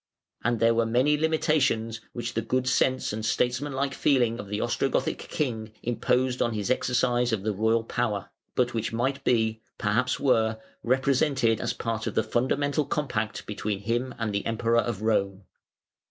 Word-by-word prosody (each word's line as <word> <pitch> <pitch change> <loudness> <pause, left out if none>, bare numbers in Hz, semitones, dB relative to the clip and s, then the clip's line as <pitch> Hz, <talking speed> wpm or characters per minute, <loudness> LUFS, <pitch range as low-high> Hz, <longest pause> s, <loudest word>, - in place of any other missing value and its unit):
And 120 0 +1
there 115 +1 +4
were 115 0 +2
many 130 +6 +3
limitations 150 -8 +1
which 120 -1 -4
the 115 - 0
good 130 +3 -1
sense 130 -2 +1
and 110 +1 -4
statesmanlike 135 +4 0
feeling 120 -5 +2
of 100 - -6
the 105 +1 -3
Ostrogothic 120 +4 0
king 110 -7 -2
imposed 125 +1 0
on 120 -1 +1
his 105 +3 -1
exercise 125 -1 +1
of 105 -4 -1
the 110 0 0
royal 110 +3 +2
power, 110 -5 -2 0.2
but 125 -1 +1
which 115 -1 -2
might 130 +4 -1
be, 110 -2 +1 0.2
perhaps 120 +5 +1
were, 110 -5 +2 0.2
represented 130 -2 +2
as 120 0 -1
part 115 -2 -3
of - - -3
the 110 - +3
fundamental 145 +4 0
compact 110 -8 -2
between 105 0 -3
him 120 +4 -1
and 115 -3 -2
the 100 - -1
Emperor 115 +1 +2
of 110 -2 -4
Rome. 100 -3 0
120 Hz, 165 wpm, -27 LUFS, 110-130 Hz, 0.2 s, there